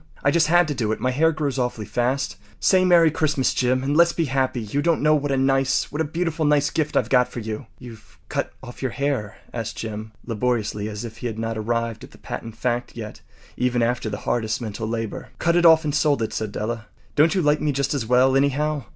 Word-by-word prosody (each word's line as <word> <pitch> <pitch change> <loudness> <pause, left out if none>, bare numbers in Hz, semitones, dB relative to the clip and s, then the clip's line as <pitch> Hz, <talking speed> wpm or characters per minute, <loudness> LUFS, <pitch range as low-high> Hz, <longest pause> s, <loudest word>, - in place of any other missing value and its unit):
I 140 - +4
just 160 0 +3
had 175 +1 +4
to 150 - -1
do 115 -5 -1
it. 110 - -2
My 130 - 0
hair 160 +5 +3
grows 145 -4 -2
awfully 125 -3 -2
fast. 125 -5 -1 0.2
Say 185 -1 +4
‘Merry 170 -3 +5
Christmas!’ 150 -4 +1
Jim, 130 +1 +1
and 140 +2 0
let’s 170 +1 +5
be 165 - 0
happy. 130 -2 0
You 110 +7 -2
don’t 170 +1 +2
know 155 0 +5
what 145 -1 0
a 135 - +1
nice—what 135 +3 +1
a - - +1
beautiful, 165 +1 -2
nice 150 -1 +3
gift 155 -2 0
I’ve - - +2
got 125 -2 +4
for 125 - -7
you.” 110 +2 -5
“You’ve 115 -3 -13
cut - - -2
off 120 -1 -10
your 130 - 0
hair?” 135 -7 -2 0.2
asked 115 -2 -4
Jim, 110 -1 -6
laboriously, 110 -3 -1
as 105 +2 -6
if 115 -1 -9
he 120 - -4
had 110 -2 -5
not 115 0 -2
arrived 115 +1 -2
at - - -10
that - - -19
patent 115 -1 -6
fact 120 0 -2
yet 110 -2 -7 0.3
even 125 -1 +1
after 120 -1 0
the 100 - -4
hardest 110 -2 0
mental 110 -1 -4
labor. 115 -1 -4
“Cut 170 0 +1
it 175 -1 +6
off 160 0 +6
and 150 -2 -1
sold 145 -5 +2
it,” 110 - -3
said 110 -2 -3
Della. 110 +1 -4 0.3
“Don’t 155 +4 +4
you 185 - +1
like 150 0 +2
me 150 - +1
just 140 +1 -1
as 130 -6 -2
well, 130 +2 +4
anyhow? 140 0 +1
130 Hz, 235 wpm, -23 LUFS, 115-150 Hz, 0.3 s, it